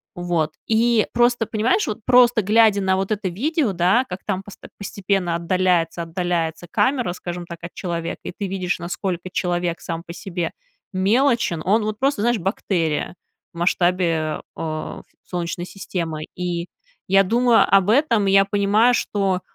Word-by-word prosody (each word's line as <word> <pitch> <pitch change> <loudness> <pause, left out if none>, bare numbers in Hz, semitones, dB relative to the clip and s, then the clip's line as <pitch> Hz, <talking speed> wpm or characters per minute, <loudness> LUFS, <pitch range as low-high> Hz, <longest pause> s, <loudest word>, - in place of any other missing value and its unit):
Вот, 170 -3 -1
и 225 0 +3
просто, 240 -1 +3
понимаешь, 225 - +1
вот 215 - -3
просто 245 -2 +5
глядя 210 0 +4
на 190 0 +2
вот 195 +2 -2
это 200 -3 -1
видео, 265 - 0
да, 185 +9 +3
как 180 +1 -6
там 195 -2 -2
пост 205 - -13 0.2
постепенно 195 -3 -1
отдаляется, 170 -1 +1
отдаляется 170 -1 -2
камера, 250 -4 +1
скажем 175 -1 -6
так, 170 -1 -9
от 170 - -7
человека, 170 -2 -4
и - - -6
ты 200 - -3
видишь, 185 -2 -2
насколько 180 +1 -4
человек 175 -2 -1
сам 165 0 -5
по 170 - -9
себе 175 -2 -4 0.4
мелочен, 215 - +2
он 210 +3 +3
вот 215 0 -3
просто, 270 -5 +1
знаешь, 240 -1 +2
бактерия 175 -4 -1 0.4
в 170 - -9
масштабе, 175 -3 +1 0.2
э, 155 -1 -4 0.2
Солнечной 175 0 -4
системы. 165 -5 -4
И 175 -1 -3 0.4
я 195 +1 +5
думаю 235 +3 +4
об 195 +1 +4
этом, 230 -5 +3
и - - +3
я 195 0 +6
понимаю, 205 +4 +3
что, 195 -3 0
190 Hz, 155 wpm, -22 LUFS, 175-215 Hz, 0.4 s, я